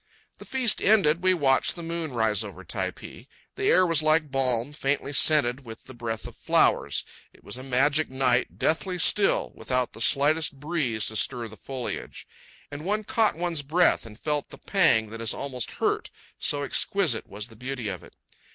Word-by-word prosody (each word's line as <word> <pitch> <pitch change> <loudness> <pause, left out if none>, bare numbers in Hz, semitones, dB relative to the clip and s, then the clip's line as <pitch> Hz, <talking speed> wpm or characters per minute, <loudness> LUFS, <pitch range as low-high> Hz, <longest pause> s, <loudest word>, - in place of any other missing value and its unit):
The - - -11
feast 255 -5 +1
ended, 180 -5 +3
we 185 0 +4
watched 135 -5 +2
the 170 - -8
moon 165 -2 -3
rise 110 -3 +1
over 95 -3 -9
Typee. - - -6 0.3
The - - -4
air 185 - +5
was 165 -3 +3
like 155 -1 +2
balm, 130 0 +1
faintly 140 0 -2
scented 140 -3 +3
with 115 -2 -10
the 130 - -12
breath 115 -2 -5
of - - -11
flowers. - - +1 0.3
It - - -22
was - - -7
a 130 - -7
magic 140 +4 +1
night, 130 -1 0
deathly 180 +3 0
still, 195 +4 +4
without 125 -1 -2
the 115 - -10
slightest 145 +3 +1
breeze 145 -8 -1
to 110 - -8
stir 120 +2 -1
the 110 - -12
foliage; 130 +1 -6 0.4
and 145 +1 -7
one 210 +4 -1
caught 220 +1 +1
one's 170 -2 -1
breath 160 -2 +2
and 105 0 -13
felt 150 -2 -2
the - - -12
pang 135 - +2
that 115 0 -7
is 115 -2 0
almost 130 -4 -4
hurt, - - -1 0.3
so 145 -1 0
exquisite 155 - 0
was 105 +3 -7
the 115 - -15
beauty 125 0 -5
of 95 -3 -5
it. - - -17
140 Hz, 185 wpm, -26 LUFS, 120-160 Hz, 0.4 s, air